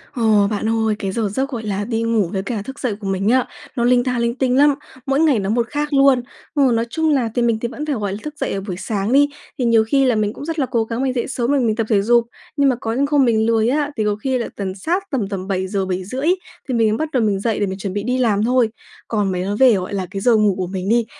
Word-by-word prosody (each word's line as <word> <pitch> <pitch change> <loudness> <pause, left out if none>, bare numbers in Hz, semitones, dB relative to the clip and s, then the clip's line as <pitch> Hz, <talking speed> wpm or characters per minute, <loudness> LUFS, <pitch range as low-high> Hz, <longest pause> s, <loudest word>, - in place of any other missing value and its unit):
Ồ, 215 -4 +3
bạn 215 +1 -1
ơi, 220 -1 +1
cái 195 - -2
giờ 215 0 -1
giấc 265 +7 -2
gọi 240 -5 -5
là 205 -1 -2
đi 225 -1 -2
ngủ 220 -6 +1
với 195 -1 -2
cả 215 0 -3
thức 265 +6 -9
dậy 235 -6 -1
của 200 - -6
mình 195 +2 0
á, 255 +1 +3 0.3
nó 235 - 0
linh 245 0 +4
ta 250 -2 -1
linh 235 +1 0
tinh 260 -1 +1
lắm, 290 0 +5 0.3
mỗi 275 +1 +1
ngày 300 -8 +3
nó 195 - -2
một 235 +1 +1
khác 295 0 -2
luôn. 275 -2 +5 0.3
Ừ, 275 -4 +4
nói 230 +1 +1
chung 320 +5 0
là 255 -6 +2
thì 245 - +1
mình 230 -2 +1
thì 235 - -1
vẫn 295 +5 -6
phải, 290 -3 -1
gọi 205 -3 -2
là, 200 - -4
thức 300 - -6
dậy - - -2
ở 195 - -3
buổi 190 -2 -5
sáng 210 +1 -2
đi, 285 +1 +5 0.3
thì 245 - +1
nhiều 230 -1 +4
khi 275 +2 +3
là 250 -3 +3
mình 210 0 0
cũng 285 - -8
rất 325 -1 -3
là 265 - +2
cố 235 -3 0
gắng 230 +3 -3
mình 260 - 0
dậy 240 -2 -2
sớm 250 0 -1
rồi 285 - +3
mình 225 -3 +1
tập 225 -1 -1
thể 205 -3 +3
dục. 235 +2 +4 0.3
Nhưng 280 -1 +4
mà 255 - +1
có 225 0 -2
những 275 +3 +1
hôm 285 -3 +4
mình 220 -2 +2
lười 225 0 +2
á, 290 +2 0
thì 215 - +1
có 210 -1 +1
khi 260 +4 -1
là 235 - -3
tầm 190 -2 -4
sát 340 - -1
tầm 240 -8 -1
tầm 190 -2 -5
7:00-7:30 190 - -2 0.4
thì 255 - 0
mình 225 -2 +3
mới 215 - 0
bắt 315 0 -2
đầu 250 -5 +1
mình 200 -2 +1
dậy 220 +1 -1
để 205 - +1
mình 190 0 -4
chuẩn 190 -1 -4
bị 205 - -2
đi 250 +3 0
làm 220 -5 +2
thôi. 245 -1 +3 0.4
Còn 205 -4 0
mấy 180 - -2
nói 200 +2 -2
về, 260 -3 +6
gọi 185 0 -2
là, 190 -2 -2
cái 195 0 -4
giờ 240 0 +4
ngủ 210 -3 +3
của 185 - -2
mình 190 +1 -4
đi, 235 0 +3
230 Hz, 305 wpm, -20 LUFS, 205-260 Hz, 0.4 s, về